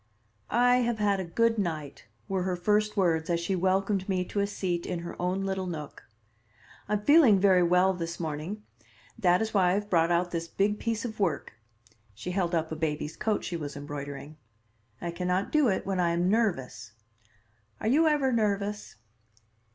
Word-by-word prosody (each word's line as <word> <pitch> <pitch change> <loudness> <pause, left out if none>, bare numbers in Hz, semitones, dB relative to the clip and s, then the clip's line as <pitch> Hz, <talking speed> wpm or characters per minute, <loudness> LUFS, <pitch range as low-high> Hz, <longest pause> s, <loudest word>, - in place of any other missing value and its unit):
"I 245 +1 +4
have 240 -2 0
had 205 -2 +1
a - - -2
good 225 +6 +1
night," 155 - -4 0.2
were 190 -1 -1
her 185 0 -1
first 210 +4 +1
words 165 -4 +1
as 170 -1 +1
she 180 +3 -1
welcomed 190 +2 0
me 185 -1 0
to 205 - -2
a 200 - +1
seat 180 -4 -3
in 175 -2 -3
her 170 - -7
own 185 +2 -1
little 190 -1 -2
nook. 155 -4 -7 0.8
"I'm 210 0 0
feeling 280 -7 +6
very 190 -2 +5
well 180 +2 +4
this 170 -1 -5
morning. 165 +6 -4 0.6
That 180 -1 +3
is 220 - -4
why 190 -3 +4
I - - +2
have 205 +1 -2
brought 165 -2 +3
out 175 +1 +1
this 170 -1 -3
big 205 +4 0
piece 230 0 -2
of 220 -2 -6
work." 180 - -1 0.6
She 125 - -5
held 180 -2 0
up 160 -1 -1
a - - -2
baby's 155 -1 -3
coat 215 -2 -1
she 175 - -4
was 150 -3 -5
embroidering. 145 0 -7 0.6
"I 170 - -4
can 180 +1 -4
not 185 +2 0
do 305 -3 +4
it 195 - 0
when 190 -1 -1
I 175 -1 +2
am 175 +2 +1
nervous. 130 - -1 0.9
Are - - -3
you 305 +7 +4
ever 290 -4 +2
nervous?" 205 -2 -1
185 Hz, 190 wpm, -28 LUFS, 170-210 Hz, 0.9 s, feeling